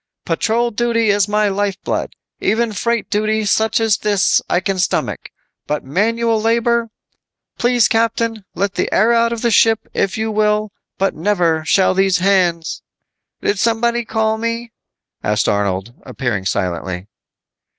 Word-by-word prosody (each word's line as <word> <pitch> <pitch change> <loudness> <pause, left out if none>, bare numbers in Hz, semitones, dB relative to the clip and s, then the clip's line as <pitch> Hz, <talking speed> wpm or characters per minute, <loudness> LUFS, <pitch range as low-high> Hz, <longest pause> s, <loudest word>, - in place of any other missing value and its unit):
"Patrol 230 +8 0
duty 230 -1 +1
is 200 0 +2
my 210 0 +1
lifeblood. 200 0 -2 0.2
Even 230 0 0
freight 235 +3 -1
duty 215 +1 0
such 220 +2 +2
as 225 -2 +2
this 205 -3 +2
I 175 - +2
can 190 +1 -2
stomach. 180 - -1 0.4
But 150 0 -2
manual 225 - 0
labor! 230 +1 +1 0.7
Please 240 -1 +3
captain, 225 -1 0
let 200 +1 -1
the - - -2
air 225 +4 +3
out 230 0 +2
of 235 0 -4
the 235 - +2
ship, 225 0 +3
if 195 - -1
you 220 0 -1
will, 210 0 +1 0.3
but 195 0 0
never 170 -3 +1
shall 190 +3 +3
these 190 -1 +2
hands 180 -3 +1 0.4
" - - -21
"Somebody 235 +3 0
call 220 -1 -1
me?" 230 +1 -3 0.5
asked 105 -1 +1
Arnold, 100 +2 -1
appearing 110 -8 -3
silently. 90 -1 -3
210 Hz, 140 wpm, -18 LUFS, 185-230 Hz, 0.7 s, Please